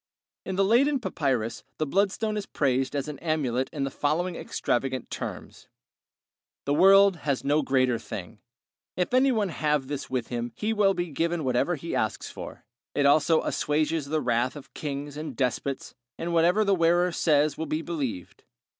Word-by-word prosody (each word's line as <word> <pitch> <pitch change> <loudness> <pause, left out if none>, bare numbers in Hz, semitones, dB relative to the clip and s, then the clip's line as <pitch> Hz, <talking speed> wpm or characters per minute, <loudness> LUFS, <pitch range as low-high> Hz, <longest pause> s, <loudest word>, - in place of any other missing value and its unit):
In 190 - -2
the 195 +1 +3
Leyden 270 +7 +3
papyrus 135 - -2
the 155 - 0
bloodstone 200 +6 0
is 210 -2 -4
praised 135 -1 0
as 140 0 -2
an 150 -2 -6
amulet 135 -6 -1
in 145 - -3
the 135 - -2
following 170 +6 -1
extravagant 130 -3 -2
terms: - - -7 1.0
The 140 - +1
world 195 +3 +6
has 140 -3 -2
no 145 +2 +2
greater 130 -4 +1
thing; 105 0 -8 0.6
if 180 +6 -1
any 260 +1 +5
one 215 -5 0
have 150 -4 0
this 140 0 -5
with 125 -3 -2
him 120 -1 -3
he 215 +1 -1
will 200 -3 +3
be 175 -2 -3
given 165 +3 -1
whatever 130 +7 +1
he 165 +3 -6
asks 110 - -2
for; - - -9 0.3
it 145 - +2
also 155 +3 +4
assuages 155 0 0
the 155 +1 0
wrath 125 +1 0
of 145 - -12
kings 145 0 -5
and 155 +1 -5
despots, 130 +1 -2 0.2
and 170 +1 -3
whatever 175 +6 +4
the 200 - +3
wearer 175 0 +3
says 150 -3 +2
will 160 - -4
be 155 +2 -2
believed. 135 - -5
150 Hz, 170 wpm, -27 LUFS, 135-175 Hz, 1.0 s, world